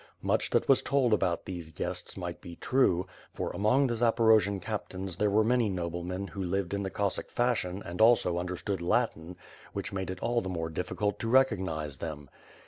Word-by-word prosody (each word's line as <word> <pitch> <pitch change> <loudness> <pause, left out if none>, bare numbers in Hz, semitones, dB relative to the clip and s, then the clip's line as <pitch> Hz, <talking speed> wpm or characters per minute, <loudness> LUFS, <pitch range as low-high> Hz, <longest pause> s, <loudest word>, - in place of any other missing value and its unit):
Much - - +1
that - - +1
was - - +5
told 130 -4 +2
about 95 -5 +1
these 85 -4 -6
guests - - -4
might - - -5
be 85 - -9
true; 95 -9 +2 0.3
for, - - -2
among 110 +9 +3
the 120 - 0
Zaporojian 110 -3 +3
captains 95 -3 -4
there 105 +1 +2
were 105 +2 +4
many 120 -1 +2
noblemen 90 +1 -3
who 100 - -6
lived 95 0 -1
in 100 - -1
the 95 - -2
Cossack 100 +1 -2
fashion 100 -6 0
and 90 +4 -4
also 110 -7 +5
understood 90 +1 -3
Latin, 90 -3 0 0.4
which - - -4
made 95 -1 -3
it 95 0 -5
all 120 +3 +1
the 95 - -5
more 80 -3 -3
difficult 95 +5 -2
to 115 - -2
recognize 90 - +2
them. 75 -4 -7
95 Hz, 185 wpm, -30 LUFS, 90-110 Hz, 0.4 s, was